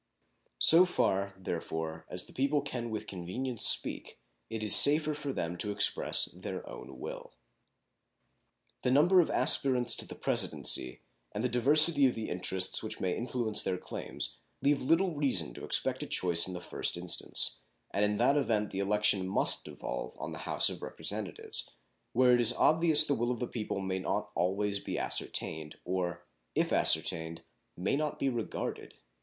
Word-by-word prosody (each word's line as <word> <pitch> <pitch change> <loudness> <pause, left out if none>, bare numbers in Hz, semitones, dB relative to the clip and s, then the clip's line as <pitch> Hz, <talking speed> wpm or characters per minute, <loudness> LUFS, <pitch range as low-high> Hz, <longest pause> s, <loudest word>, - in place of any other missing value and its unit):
So 165 - +8
far, 100 - -1
therefore, 80 -3 -6
as 90 - -5
the - - -17
people 140 +2 0
can 120 -4 -5
with 110 -1 -5
convenience 105 +7 -2
speak, - - +2 0.3
it 110 -1 -5
is 105 - +7
safer 150 +1 +8
for 145 -1 -5
them 85 -7 -4
to 105 - +4
express 100 0 +2
their - - -8
own 65 -2 -11
will. - - -8 1.5
The - - -1
number 170 +8 +4
of 165 - -2
aspirants 125 -3 +3
to - - -5
the - - -9
Presidency 65 0 +1 0.3
and 105 - -4
the 125 - 0
diversity 140 +4 +4
of 125 - -2
the 110 - -5
interests 90 +1 0
which - - -6
may 90 -1 -2
influence 115 -2 -1
their 95 -1 -2
claims - - -4 0.2
leave 140 +1 +1
little 170 +6 +1
reason 125 - -1
to - - -11
expect - - -2
a - - -5
choice 85 -1 +1
in 95 - -6
the 90 - -7
first 85 - -2
instance, 90 0 0 0.3
and 100 - 0
in 105 0 0
that 135 +5 +2
event 110 -7 -1
the 95 - -5
election 100 -1 0
must 95 - +1
devolve - - -7
on - - -6
the - - -8
House - - +2
of - - -4
Representatives, - - -5 0.4
where 125 0 +4
it 120 - +3
is 120 0 +4
obvious 160 -1 +4
the 145 - 0
will 120 -2 -2
of 125 - -2
the 125 - -3
people 105 -4 -5
may 95 -1 -3
not 95 - -4
be - - -5
always 100 +3 -2
ascertained, 80 -1 -3
or, 90 -2 -4 0.3
if - - 0
ascertained, 80 0 0 0.3
may 90 - -1
not 150 0 -3
be 135 - -1
regarded. 120 -3 -5
110 Hz, 170 wpm, -30 LUFS, 95-135 Hz, 1.5 s, So